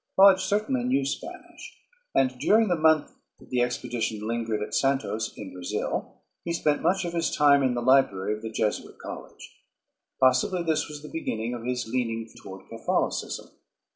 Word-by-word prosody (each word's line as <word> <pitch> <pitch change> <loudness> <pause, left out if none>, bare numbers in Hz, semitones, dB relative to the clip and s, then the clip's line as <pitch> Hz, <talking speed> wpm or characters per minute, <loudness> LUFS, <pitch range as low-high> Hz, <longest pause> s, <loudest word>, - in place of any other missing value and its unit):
Lodge 190 -1 +8
certainly 215 +6 0
knew 140 - +1
Spanish; 360 - -7 0.4
and 130 -1 +3
during 220 - +4
the 175 - +3
month 155 -2 +3 0.3
that - - -19
the 125 -1 +2
expedition 120 -3 -2
lingered 115 -2 -1
at - - -7
Santos 110 -5 0
in 95 - -8
Brazil, 90 -1 -4 0.2
he 170 - -3
spent 150 -3 +1
much 190 0 +1
of 170 - -4
his 170 -1 +1
time 145 -1 +5
in 130 -2 +1
the 120 - -2
library 120 -7 +3
of 105 - -6
the 110 - -5
Jesuit 110 -1 -2
College. - - -10 0.6
Possibly 130 +8 +3
this 160 -2 0
was 150 -1 -8
the - - -7
beginning 115 -7 -3
of 120 -1 -6
his 125 -2 -2
leaning 115 -2 -2
toward 95 0 -11
Catholicism. - - -2
130 Hz, 170 wpm, -26 LUFS, 115-165 Hz, 0.6 s, Lodge